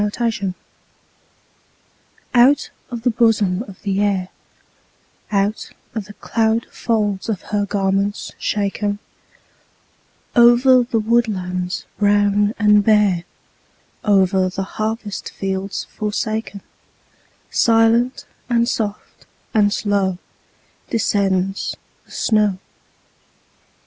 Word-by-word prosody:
SNOW 210 - +1
FLAKES 210 -4 -2 1.8
Out 260 +4 +4 0.2
of 235 -2 -6
the 245 - +3
bosom 220 -5 +2
of 195 -2 -13
the 195 -1 0
Air, 195 -3 0 1.0
Out 200 +1 -1 0.2
of 220 -3 -4
the 210 - -12
cloud 225 0 0
folds 210 -3 -1
of 210 -5 -2
her 205 -1 +1
garments 200 +1 -1
shaken, 205 0 -1 1.4
Over 245 +2 +6
the 240 -1 -1
woodlands 190 -5 -1
brown 205 0 +3
and 210 -1 +4
bare, 205 -5 +3 0.8
Over 190 -2 +3
the 195 +1 -4 0.2
harvest 215 -2 -3
fields 195 0 -3
forsaken, 215 -1 -3 0.9
Silent, 230 +2 +3 0.2
and 235 -1 +2
soft, 210 -4 -4 0.3
and 205 -2 +3
slow 200 -3 0 0.7
Descends 195 -3 0 0.3
the - - -22
snow. 210 -4 +1
205 Hz, 95 wpm, -20 LUFS, 195-225 Hz, 1.8 s, Over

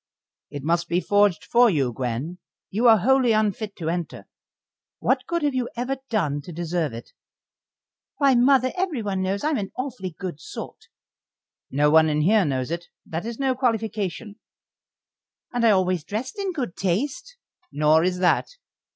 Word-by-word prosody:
"It 145 -2 -7
must 170 +2 +1
be 175 +1 +2
forged 205 -3 +2
for 240 0 +5
you, 135 - 0
Gwen. 130 +9 -4 0.3
You 230 +5 +2
are 225 -1 +8
wholly 255 +3 +3
unfit 215 -1 0
to 165 -3 -3
enter. 170 -1 -4 0.7
What - - 0
good 340 -2 -1
have 290 -2 +1
you 255 -2 -1
ever 250 +3 -2
done 150 -10 0
to 160 - -10
deserve 170 -2 -2
it?" 115 +1 -9 1.1
"Why, 280 -2 +4
mother, 255 +1 +4
everyone 235 - -2
knows 190 +2 -1
I'm 300 -4 +1
an 195 -1 -5
awfully 230 - -5
good 180 -6 -5
sort." - - -9 0.8
"No 145 +2 +2
one 160 0 +6
in 150 0 +1
here 200 +4 +4
knows 130 -1 -2
it. 170 +1 -4 0.2
That 165 +7 -5
is 235 -1 -5
no 270 -1 +1
qualification." 220 -4 -2 1.1
"And 245 -1 0
I 230 - +6
always 185 -4 +2
dressed 230 - -5
in 395 -1 -1
good 255 - -4
taste." 280 - -2 0.3
"Nor 150 +2 +3
is 180 0 0
that." 180 -1 +2
200 Hz, 160 wpm, -24 LUFS, 165-245 Hz, 1.1 s, are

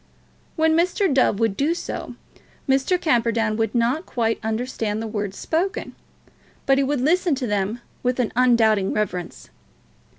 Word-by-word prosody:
When 320 -1 +3
Mr. 360 0 +2
Dove 255 -6 +2
would 225 -4 +1
do 300 +8 +1
so, - - -6 0.5
Mr. 270 +7 +2
Camperdown 230 -8 +1
would 225 +2 -1
not 245 +9 +1
quite 225 -2 -1
understand 220 -1 -2
the 225 - -4
words 205 -3 -4
spoken, 355 +5 -2 0.7
but 270 0 +3
he - - +3
would 275 -1 0
listen 345 +2 +2
to 260 -1 -3
them 210 +2 -1 0.2
with 250 0 -1
an 245 - 0
undoubting 225 -5 +3
reverence. 180 -5 -4
245 Hz, 145 wpm, -22 LUFS, 220-290 Hz, 0.7 s, When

